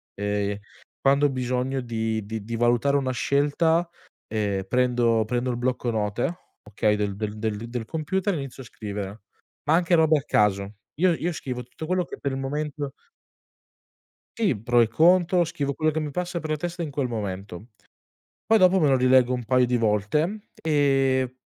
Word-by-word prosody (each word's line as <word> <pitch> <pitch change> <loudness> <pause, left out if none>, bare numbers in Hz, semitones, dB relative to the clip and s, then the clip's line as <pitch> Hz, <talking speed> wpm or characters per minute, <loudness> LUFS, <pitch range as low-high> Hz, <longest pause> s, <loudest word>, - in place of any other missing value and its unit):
ehm, 105 0 -1 0.4
quando 140 +1 +4
ho - - -2
bisogno 130 +1 -1
di 110 -2 -2
di 110 0 -5
di 115 +2 -5
valutare 120 +4 +2
una 130 -2 -1
scelta, 155 +6 +1 0.4
ehm, 105 -3 -1
prendo 120 -2 +2
prendo 125 +2 -1
il 120 - -3
blocco 125 0 -1
note, 110 +9 -1 0.3
okay, 105 +1 +1
del 105 -1 -2
del 105 +1 -3
del 120 -2 -4
computer, 185 - -1
inizio 135 -3 -6
a - - -14
scrivere, 105 -2 -6 0.5
ma 155 - +4
anche 175 +1 +1
robe 160 -1 +4
a - - -10
caso. 100 -4 +1 0.3
Io 185 -1 +4
io 170 +2 -2
scrivo 125 -5 -5
tutto 125 +6 -9
quello 185 +2 +1
che - - -8
per 140 - -2
il 135 - -3
momento 145 +1 -3 1.5
Sì, 200 - +2
pro 120 +3 +2
e 115 - +4
contro. 175 +4 +4
Scrivo 140 -4 -3
quello 155 +2 +1
che 160 - -2
mi 150 -2 -3
passa 180 +2 -3
per 155 -1 -5
la 155 - 0
testa 175 +2 -4
in 150 - -5
quel 140 -2 -1
momento. 100 -2 -5 0.8
Poi 225 +2 +5
dopo, 185 -1 +5
me 150 - +4
lo 135 - +4
rileggo 125 0 +4
un 125 -2 -3
paio 125 +1 +3
di 125 0 +1
volte 120 - 0
e 135 -4 +2
130 Hz, 175 wpm, -25 LUFS, 110-155 Hz, 1.5 s, Poi